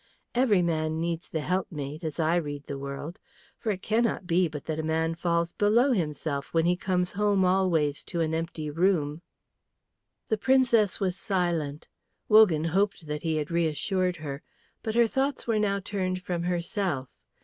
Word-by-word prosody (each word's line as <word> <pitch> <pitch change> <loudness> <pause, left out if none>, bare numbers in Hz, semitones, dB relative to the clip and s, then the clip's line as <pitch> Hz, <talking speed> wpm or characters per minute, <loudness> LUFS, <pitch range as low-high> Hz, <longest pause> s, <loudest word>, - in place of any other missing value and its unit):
Every 230 -7 +3
man 160 -1 0
needs 170 0 -3
the 160 - -2
helpmate, 155 -3 -3
as 155 0 -4
I 160 +1 +2
read 145 -3 -4
the 140 - -5
world. 140 +4 -6 0.4
For 220 - -1
it 190 -2 -5
cannot 230 +1 +1
but - - -20
be 175 +1 +3
that 155 +1 -5
a - - +1
man 160 +1 0
falls 170 0 0
below 235 +6 +3
himself 150 - -2
when 165 0 +3
he 175 +1 +3
comes 180 -1 0
home 200 -2 +2
always 175 -6 +2
to 170 - -4
an 160 -1 0
empty 160 -2 -3
room." 165 -2 +1 1.1
The 220 - +1
Princess 235 -4 +3
was 185 -2 0
silent. 170 -6 -1 0.4
Wogan 210 -8 +6
hoped 195 +1 0
that 150 0 -4
he 160 -1 -1
had 150 +1 -2
reassured 170 +3 0
her. 145 -3 -6 0.4
But 220 0 -3
her 235 0 +6
thoughts 270 +4 -1
were 225 -2 +1
now 200 -1 +1
turned 185 -2 -3
from 175 -3 -2
herself. 175 - -2
170 Hz, 170 wpm, -27 LUFS, 155-195 Hz, 1.1 s, Wogan